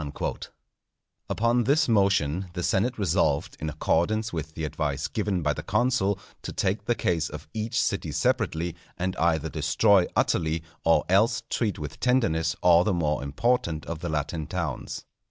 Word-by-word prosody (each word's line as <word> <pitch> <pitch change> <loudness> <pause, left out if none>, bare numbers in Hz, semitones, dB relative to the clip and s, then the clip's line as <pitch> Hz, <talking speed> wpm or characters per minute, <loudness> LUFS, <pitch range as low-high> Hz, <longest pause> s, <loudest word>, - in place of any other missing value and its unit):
_" - - -4 0.8
Upon 120 +1 +2
this 145 +2 +3
motion 95 - +2
the 90 0 -3
senate 115 +9 +1
resolved, 85 -7 +1
in 80 - -3
accordance 90 +8 0
with 80 -1 -5
the 80 - -4
advice 75 -2 -2
given 95 -5 -1
by 75 0 +2
the 75 - -5
consul, 100 - +1 0.2
to - - -6
take 100 +2 -1
the 120 - +1
case 85 -6 0
of - - -9
each 110 +1 -1
city - - -1
separately, 80 +1 0 0.2
and 95 +1 -2
either 80 -2 +1
destroy 85 +5 +3
utterly 80 0 +1 0.2
or 80 -2 +3
else 110 +5 +3
treat 110 -4 0
with 75 -3 -7
tenderness 85 -11 +1
all 85 -1 +6
the 95 -1 +1
more 75 -3 0
important 80 - 0
of 85 -2 -5
the 85 - -4
Latin 75 +1 -2
towns. - - -4
85 Hz, 160 wpm, -26 LUFS, 80-105 Hz, 0.8 s, all